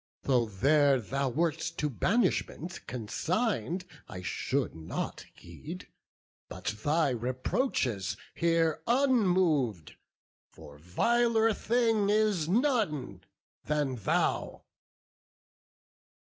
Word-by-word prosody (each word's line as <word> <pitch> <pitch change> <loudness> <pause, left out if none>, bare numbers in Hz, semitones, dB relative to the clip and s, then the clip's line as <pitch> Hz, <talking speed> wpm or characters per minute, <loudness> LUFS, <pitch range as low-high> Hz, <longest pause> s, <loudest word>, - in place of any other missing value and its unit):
Though 125 -4 +2
there 140 +6 +3
thou 135 +4 -2
wert 160 +4 0 0.2
to 150 - 0
banishment 180 - -1
consign'd, 170 - -2 0.2
I 90 0 -7
should 130 +8 -1
not 80 -1 -5
heed, 150 - -10 0.6
but - - -4
thy 155 0 +2
reproaches 125 - -1 0.2
hear 165 -2 +1
Unmov'd; 185 - +2 0.6
for 75 0 -14
viler 225 - +2
thing 225 -3 +1
is 210 -6 +2
none 180 - 0 0.4
than 145 -4 0
thou." 105 - -1
150 Hz, 85 wpm, -30 LUFS, -, 0.6 s, there